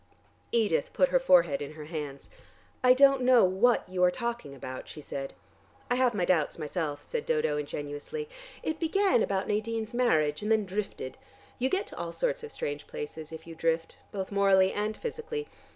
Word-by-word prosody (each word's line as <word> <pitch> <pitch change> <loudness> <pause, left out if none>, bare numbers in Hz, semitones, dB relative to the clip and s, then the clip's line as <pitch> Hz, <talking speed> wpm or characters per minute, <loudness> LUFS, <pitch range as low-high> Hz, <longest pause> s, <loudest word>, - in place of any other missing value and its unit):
Edith 205 -11 +1
put 275 - +3
her 265 - +4
forehead 170 - +4
in 145 +1 -5
her 155 -1 -9
hands. 150 -3 -6 0.5
"I 250 0 +7
don't 275 0 +6
know 250 -1 +6
what 195 +7 +3
you 180 0 0
are 180 - +7
talking 235 - -4
about," 130 -1 -7
she - - -9
said. 135 -2 -6 0.6
"I - - +6
have 250 -3 +2
my 180 -3 +1
doubts 170 -5 +1
myself," 150 -1 -3
said 475 -2 -3
Dodo 465 - +1
ingenuously. 145 - -5 0.4
"It 315 0 -2
began 375 - +3
about 195 -2 0
Nadine's 220 +1 -2
marriage 155 -12 +2
and 210 +1 -1
then 220 -2 +3
drifted. 190 -8 -4 0.4
You 260 +2 +1
get 385 +6 0
to - - -10
all - - -3
sorts - - -1
of 455 - -7
strange 145 - -4
places 155 +1 -7
if 160 0 -8
you 165 - -9
drift, 165 0 -1
both 195 -2 -4
morally 195 -1 +4
and 210 +1 -2
physically. 460 -1 -4
195 Hz, 185 wpm, -29 LUFS, 155-255 Hz, 0.6 s, I